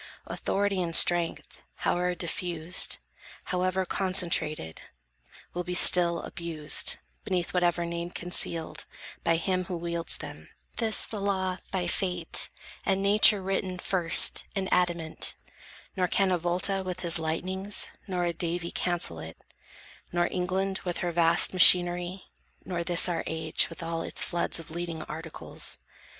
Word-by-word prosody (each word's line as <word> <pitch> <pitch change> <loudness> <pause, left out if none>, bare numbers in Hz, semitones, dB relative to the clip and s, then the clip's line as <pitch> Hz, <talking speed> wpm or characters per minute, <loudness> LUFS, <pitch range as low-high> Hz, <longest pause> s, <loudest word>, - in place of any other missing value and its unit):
Authority 200 -1 -2
and 165 -2 0
strength, 175 -1 +3 0.2
howe'er 180 0 -1
diffused, 170 0 +1 0.5
However 185 +1 -1
concentrated, 170 - -1 0.7
will 180 - -4
be 180 +1 -5
still 170 -1 +8
Abused, 165 -4 -1 0.3
beneath 180 -2 -3
whatever 175 -1 0
name 170 0 -5
concealed, 165 -2 -2 0.4
By 165 - +2
him 185 +2 -2
who 175 0 -5
wields 170 0 -2
them; - - -11 0.3
this 225 -2 0
the 210 -3 -7
law 190 -2 -2
by 185 -2 -3
Fate 180 -1 -2 0.3
And 195 0 -1
nature 205 0 +5
written 190 -1 -3
first, 175 -2 +4
in 195 -1 -2
adamant: 170 -3 -1 0.6
Nor 185 -2 0
can 195 +1 +1
a 180 - +1
Volta 180 +3 -1
with 185 0 -6
his 170 -2 +2
lightnings, 185 +5 -1 0.2
nor 180 -2 -2
A 170 - -2
Davy 170 +1 -3
cancel 175 - -1
it, 80 0 -10 0.7
nor 175 0 0
England 190 +1 -2
with 175 -2 -3
Her 175 - -1
vast 165 +1 +2
machinery, 180 0 +4 0.4
nor 175 -2 -4
this 175 +1 +3
our 175 -2 -2
age 160 -1 0
With 165 +1 -9
all 165 0 -4
its - - +1
floods 170 -1 -1
of 165 - -12
Leading 165 -1 -5
Articles. 160 +1 -5
175 Hz, 135 wpm, -27 LUFS, 170-185 Hz, 0.7 s, still